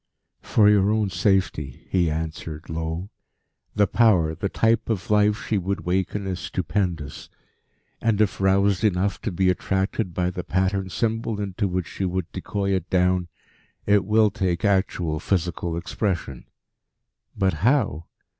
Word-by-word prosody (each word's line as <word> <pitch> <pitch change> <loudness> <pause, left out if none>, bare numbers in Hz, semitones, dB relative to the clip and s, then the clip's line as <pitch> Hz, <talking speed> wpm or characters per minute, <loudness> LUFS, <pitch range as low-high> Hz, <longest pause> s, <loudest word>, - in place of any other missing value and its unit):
"For 105 -2 +3
your 100 -1 +4
own 105 -2 +1
safety," 90 - 0
he 90 -3 +2
answered 80 0 -5
low. 80 +4 -4 0.6
"The 105 -1 +4
Power, 95 -9 +3
the 100 +4 -3
type 115 +2 +1
of 105 -2 -2
life, 105 +2 +3
she 105 - 0
would 100 +2 -2
waken 95 +2 -1
is 95 -2 -3
stupendous. 90 -6 -3 0.7
And 110 -3 +1
if 105 -2 +1
roused 100 +1 +3
enough 100 -1 +1
to 110 - -2
be 90 +1 +2
attracted 95 0 -1
by 90 0 0
the 90 0 -5
patterned 95 +1 0
symbol 115 0 -1
into 100 +1 -2
which 90 -1 -2
she 95 - -4
would 90 -1 -2
decoy 100 +1 -2
it 95 -1 -1
down, 90 -1 +2 0.6
it 100 -1 +4
will 105 +1 +3
take 95 -2 -1
actual, 95 -5 +1
physical 85 -2 -1
expression. 85 - -3 0.9
But 95 -1 +2
how? 110 - +1
95 Hz, 145 wpm, -24 LUFS, 90-105 Hz, 0.9 s, your